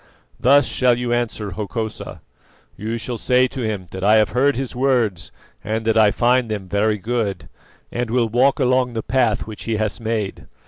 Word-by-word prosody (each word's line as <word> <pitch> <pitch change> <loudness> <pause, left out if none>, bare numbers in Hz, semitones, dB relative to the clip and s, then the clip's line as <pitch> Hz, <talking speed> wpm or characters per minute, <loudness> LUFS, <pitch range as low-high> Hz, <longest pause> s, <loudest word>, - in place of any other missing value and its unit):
Thus 140 +2 +5
shall 125 -1 +2
you 120 -1 -1
answer 110 -4 -2
Hokosa: 110 +3 -5 0.5
You 110 +3 -4
shall 120 +1 -4
say 125 +2 +3
to 130 - -6
him 105 -5 -3
that 95 0 -6
I 105 +2 +5
have 110 -1 +4
heard 140 +3 +2
his 130 0 -4
words 120 -9 0 0.3
and 110 +1 -3
that 110 - +2
I 110 -2 +6
find 120 +2 +2
them 100 -3 -4
very 105 +2 +1
good, 110 -1 -3 0.4
and 120 -1 -2
will 120 0 +1
walk 125 +6 +2
along 130 -1 +2
the 110 -1 -3
path 125 -4 +1
which 110 -1 -9
he 115 -1 -1
has 105 +1 -2
made. 110 -3 -3
115 Hz, 185 wpm, -20 LUFS, 105-125 Hz, 0.5 s, I